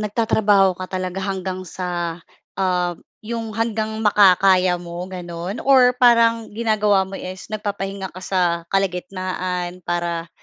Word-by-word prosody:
nagtatrabaho 210 -3 +2
ka 185 - -4 0.2
talaga 185 +1 -4
hanggang 190 -1 -4
sa, 175 -1 -4 0.4
um, 180 -2 0 0.2
'yong 225 0 -4
hanggang 220 0 -2
makakaya 190 -3 +4
mo 175 0 -7
gano'n 175 +2 -6
or 260 -2 +6
parang 230 -2 +4
ginagawa 210 -3 +2
mo 190 +1 -6
is, 185 +2 -8
nagpapahinga 200 -3 -4
ka 185 - -9
sa 185 0 0 0.3
kalagitnaan 185 -1 -2
para 170 -1 -2
190 Hz, 120 wpm, -21 LUFS, 180-215 Hz, 0.4 s, or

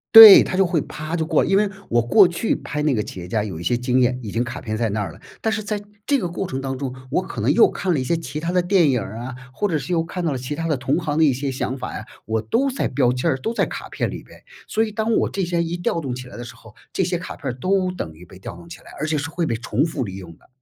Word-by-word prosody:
对， 220 -3 +13
它 - - -3
就 195 +1 +4
会 175 -2 +1
啪 155 +3 -6
就 165 -2 0
过 160 -1 +2
来。 - - -2
因 195 - +4
为 205 0 +2 0.2
我 120 0 +3
过 155 - +6
去 175 +5 0
拍 150 +2 -3
那 150 -2 +2
个 105 - 0
企 95 - -8
业 90 - -7
家 105 +3 0
有 95 -7 -5
一 - - -6
些 85 - +1
经 125 +1 +1
验， 125 0 +2
已 105 - -5
经 115 - 0
卡 120 +1 -6
片 110 -2 -3
在 115 0 +1
那 105 +1 -1
儿 100 - -4
了， - - -15 0.2
但 220 - 0
是 220 -1 -1
在 210 0 -2 0.3
这 285 - +3
个 185 -9 -2
过 180 +2 -3
程 130 -3 -4
当 135 -1 -3
中， 130 -1 -4 0.2
我 165 - +2
可 175 - -6
能 120 +7 +3
又 225 - +6
看 185 -2 -1
了 150 - +1
一 - - -1
些 170 - +1
其 150 -3 -5
他 165 +2 -3
的 180 - +3
电 175 -3 +3
影 125 -3 +1
儿 100 +3 -7
啊， 125 +2 -6 0.2
或 205 +10 -1
者 165 -5 0
是 145 +4 -5
又 170 -2 +2
看 180 +1 -5
到 165 - +1
了 135 - -2
其 130 +4 -4
他 165 +2 -3
的 150 - +1
同 130 +3 0
行 150 -3 -2
的 160 - +5
一 140 - +4
些 135 +2 -3
想 130 0 -3
法 - - -5
呀， - - -6 0.2
我 110 +1 -1
都 235 - +1
在 260 - -1
标 125 -1 +2
签 125 +1 0
儿 - - +2
都 225 - -3
在 - - +1
卡 - - -7
片 - - -2
里 - - -7
边。 - - -17 0.3
所 220 +1 +2
以 - - -5
当 220 +1 0
我 - - +2
这 195 - -2
些 170 -1 0
一 170 +1 -2
调 175 -1 -1
动 135 -6 -4
起 125 0 -8
来 - - -10
的 120 - -6
时 - - -10
候， 110 - -16 0.2
这 - - +1
些 175 0 0
卡 175 - -7
片 135 -4 -4
儿 - - -6
都 185 +7 0
等 85 - -6
于 80 +3 -15
被 90 +1 -14
调 95 - -8
动 85 0 -13
起 85 - -9
来， - - -15
而 - - -2
且 155 0 0
是 145 +2 -3
会 170 +1 -1
被 135 - -1
重 115 +4 0
复 145 -6 -3
利 95 -2 -7
用 90 -3 -9
的。 - - -26
145 Hz, 360 characters per minute, -22 LUFS, 120-175 Hz, 0.3 s, 对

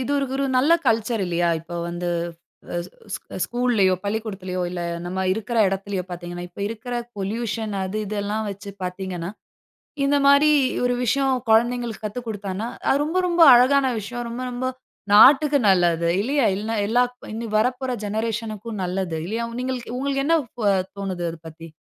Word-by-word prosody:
இதுரு 280 +1 0
ஒரு 275 +1 0
நல்ல 285 +6 +4
கல்ச்சர் 225 -1 +1
இல்லையா? 175 0 +1
இப்ப 170 +2 -10
வந்து 175 +1 -3 0.6
அ - - -2
ஸ் - - -16 0.2
ஸ் - - -3 0.3
ஸ்கூல்லேயோ 240 -6 +2
பள்ளிக்கூடத்துலையோ, 200 -3 -3
இல்ல, 180 0 -4 0.3
நம்ம 185 +2 -3
இருக்குற 220 +3 -2
இடத்திலேயோ 195 0 -3
பார்த்தீங்கன்னா, 175 0 -6
இப்ப 175 - -12
இருக்குற 230 +2 -6 0.2
பொல்யூஷன் 220 +2 -3
அது, 190 +3 -3
இதெல்லாம் 210 +1 -2
வச்சு 200 +1 -8
பார்த்தீங்கன்னா, 180 -1 -4 0.7
இந்த 285 +1 +3
மாரி 280 +2 +6 0.3
ஒரு 245 0 +2
விஷயம், 270 +2 +2 0.2
கொழந்தைங்களுக்கு 235 0 +2
கத்துக் 235 +3 -6
கொடுத்தானா 205 0 -4 0.2
அது 280 +2 +3
ரொம்ப, 325 +5 -1
ரொம்ப 345 -1 +3
அழகான 265 +3 +5
விஷயம். 240 +4 -5
ரொம்ப, 240 +2 -5
ரொம்ப 245 +1 -3 0.5
நாட்டுக்கு 285 +6 +7
நல்லது. 170 -2 +3
இல்லையா? 270 +3 +1
இல்லைனா, 220 +3 -3
எல்லாக் 245 +2 +2 0.2
இனி 230 +1 -4
வரப்போற 255 +3 0
ஜெனரேஷன் 220 +1 -2
க்கும் 220 -2 -6
நல்லது 180 -2 -2
இல்லையா? 225 +5 -2 0.2
நீங்களுக்கு 250 -1 -4
உங்களுக்கு 275 0 -1
என்ன 330 +2 +4 0.6
தோணுது 185 -3 -3
அத 165 - -8
பத்தி? 165 +1 -11
220 Hz, 150 wpm, -23 LUFS, 190-250 Hz, 0.7 s, நாட்டுக்கு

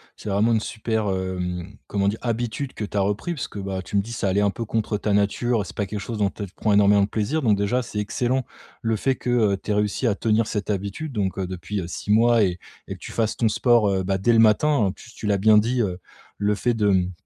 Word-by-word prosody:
c'est - - -7
vraiment 105 +4 +2
une 110 - +3
super, 110 -1 -2
hem. 95 +1 -4
Comment 100 -1 0
dire? 105 +2 0
Habitude 120 +3 -2
que 110 - -5
tu 105 - -5
as 100 - +3
repris, 105 - -1
parce 135 - -4
que, 105 - -8
bah, 95 -1 -4
tu 100 - -2
me 100 - +4
dis 115 +4 -8
ça 100 -4 -1
allait 100 +2 +2
un 100 - +3
peu 115 +3 -4
contre 110 0 -1
ta 105 0 -1
nature, 105 +3 +1
c'est - - -10
pas 105 - -1
quelque 105 +2 -5
chose 115 +1 -5
dont 100 -2 +1
tu 105 - -7
prends 105 -2 +1
énormément 100 0 +5
de - - +1
plaisir. 125 +9 -1
Donc 105 -3 +4
déjà, 100 +5 0
c'est 105 -3 -5
excellent, 120 +4 -1 0.4
le 115 -1 0
fait 130 +5 0
que, - - -5
heu, 110 -5 +3
tu - - -10
aies - - +3
réussi 105 +4 0
à 105 - +2
tenir 110 0 +1
cette 105 -1 -2
habitude, 100 +10 -4
donc 100 -4 -1
heu, 95 - -1
depuis, 95 +2 -4
heu, 85 - -6
6 95 - -7
mois 115 0 +5
et 90 -2 0 0.3
et - - -4
que - - -16
tu - - -8
fasses 110 -2 -1
ton 115 - +2
sport, 115 -1 +3
heu, 95 -1 0
bah, 95 +1 0
dès 115 +5 +2
le 115 - +5
matin. 115 +1 +4
Et - - -2
puis 115 - -15
tu 105 - -5
l'as 100 -1 +2
bien 105 +2 +6
dit, 120 +3 0
heu, 90 -2 -3 0.4
le 105 0 +1
fait 120 +3 0
de, 105 -2 +1
mmh, 95 -1 +2
105 Hz, 275 wpm, -23 LUFS, 100-115 Hz, 0.4 s, bien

